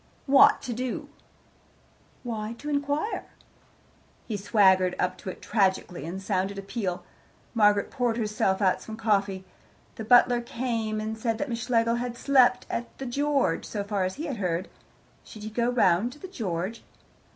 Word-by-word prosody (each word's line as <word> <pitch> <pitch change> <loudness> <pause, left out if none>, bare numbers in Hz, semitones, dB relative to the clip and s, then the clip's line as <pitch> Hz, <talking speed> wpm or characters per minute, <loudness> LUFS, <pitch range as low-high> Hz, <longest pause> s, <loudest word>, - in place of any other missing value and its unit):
"What 275 0 +6
to 245 - -3
do?" 250 +2 -4 1.1
"Why, 220 -2 -4
to 295 - -6
inquire." 285 +8 -1 1.0
He 220 - -4
swaggered 190 -3 +3
up 185 0 0
to - - -6
it - - -9
tragically, 190 -6 0
and 180 +3 -5
sounded 195 0 -1
a 195 - -5
peal. 195 -3 -3 0.5
Margaret 205 -3 +3
poured 245 -3 0
herself 210 -3 0
out 185 - +2
some 220 0 -8
coffee. 200 -4 0 0.5
The 220 - -5
butler 245 +1 +5
came, 230 -3 -2
and 215 +1 -3
said 225 0 -1
that 290 +4 -3
Miss 230 0 -3
Schlegel 230 -1 +2
had 240 0 -4
slept 250 -2 +4
at 240 - -5
the 270 - -6
George, 275 - 0
so 205 -2 -4
far 200 -1 -1
as 185 0 -2
he 310 - -5
had 275 -7 -4
heard. 180 -1 -2 0.5
Should 215 - -11
he 215 - -6
go 235 +2 +1
round 230 -1 +2
to 295 - -16
the 375 - -8
George? 205 - -4
220 Hz, 165 wpm, -27 LUFS, 195-245 Hz, 1.1 s, What